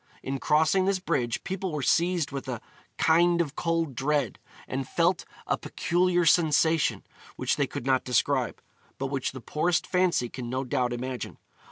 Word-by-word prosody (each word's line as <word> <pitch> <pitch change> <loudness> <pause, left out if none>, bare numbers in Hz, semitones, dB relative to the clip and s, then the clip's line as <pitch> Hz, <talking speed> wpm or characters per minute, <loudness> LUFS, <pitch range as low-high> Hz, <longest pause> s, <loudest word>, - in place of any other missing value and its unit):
In 135 +1 -3
crossing 160 +7 +3
this 195 0 +2
bridge 120 -10 -1
people 190 -1 -3
were 150 -3 -3
seized 170 0 +2
with 135 -1 -5
'a 125 -3 -3 0.4
kind 170 +2 +4
of 150 -4 -1
cold 165 -4 0
dread,' 145 +4 0 0.3
and 130 0 -4
felt 175 +1 +1 0.2
'a - - 0
peculiar 175 0 +1
sensation' 160 0 +3 0.3
which - - 0
they - - +1
could - - -6
not 130 -1 +2
describe, 125 -3 0 0.3
but 135 0 -3
which 135 -2 -1
the 130 - -9
poorest 170 +6 0
fancy 180 -10 +1
can 120 0 -7
no 130 +2 -1
doubt 125 -1 0
imagine. 125 +1 -4
150 Hz, 165 wpm, -27 LUFS, 130-175 Hz, 0.4 s, kind